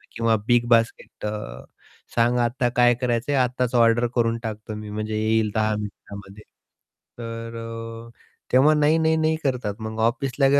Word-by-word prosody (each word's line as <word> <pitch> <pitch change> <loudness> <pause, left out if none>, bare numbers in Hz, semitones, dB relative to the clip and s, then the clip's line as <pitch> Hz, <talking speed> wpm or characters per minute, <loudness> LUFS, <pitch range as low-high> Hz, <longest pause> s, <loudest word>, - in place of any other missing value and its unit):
किंवा 115 0 +2
big 120 -1 +3
basket 115 -2 +1
अ, 105 0 -5 0.5
सांगा 120 +1 +3
आता 120 +1 0
काय 120 0 +5
करायचं 120 +2 0
आहे, 140 - +2
आत्ताच 125 0 -1
ऑर्डर 120 +1 +4
करून 115 -1 +1
टाकतो 110 -1 -6
मी 105 0 -7
म्हणजे 110 +1 -3
येईल 110 -1 +1
10 110 0 +1
मिनिटामध्ये. 100 0 -9 0.8
तर 115 0 -7 0.4
तेव्हा 145 +4 +5
नाही, 150 +2 +3
नाही, 160 0 +2
नाही 160 0 +1
करतात 125 -7 -1
मग 110 0 -6
ऑफिसला 135 +4 +1
115 Hz, 145 wpm, -23 LUFS, 110-125 Hz, 0.8 s, काय